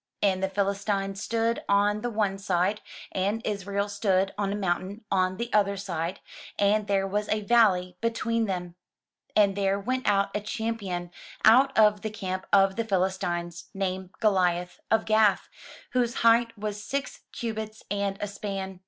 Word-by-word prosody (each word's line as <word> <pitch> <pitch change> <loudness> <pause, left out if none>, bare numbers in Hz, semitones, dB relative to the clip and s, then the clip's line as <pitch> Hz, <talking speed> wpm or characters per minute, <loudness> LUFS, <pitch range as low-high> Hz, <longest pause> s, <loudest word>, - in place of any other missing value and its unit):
And 190 -2 +2
the 190 - 0
Philistines 195 0 -1
stood 230 +1 0
on 205 +1 +3
the 245 - -2
one 205 -3 -1
side, 195 +2 0 0.3
and 200 +4 0
Israel 200 -1 -2
stood 195 -2 +1
on 200 -1 -1
a - - -1
mountain 195 +2 -2
on 185 -1 +1
the 235 +1 -4
other 200 -1 +3
side, 175 -3 -4 0.4
and 205 +1 +2
there 195 -1 +1
was 205 +2 -2
a 215 - +1
valley 195 -6 +3
between 230 0 0
them. 180 -3 -4 0.6
And 200 -2 +4
there 200 0 +1
went 255 +5 -2
out 200 -1 +2
a 210 - 0
champion 200 -5 -3 0.3
out 260 +4 +6
of 210 -2 +5
the 220 - -3
camp 185 -3 -5
of 195 0 +4
the 230 - +1
Philis 190 -3 0
tines, 175 0 -3
named 190 -1 -2
Goliath, 180 -4 +1
of 220 0 +2
Gath, 215 -2 +3 0.4
whose 245 -1 +1
height 230 0 +4
was 210 0 -4
six 275 +5 -4
cubits 220 -3 -5
and 200 -1 -1
a 205 - -1
span. 195 -2 -5
200 Hz, 160 wpm, -27 LUFS, 190-215 Hz, 0.6 s, out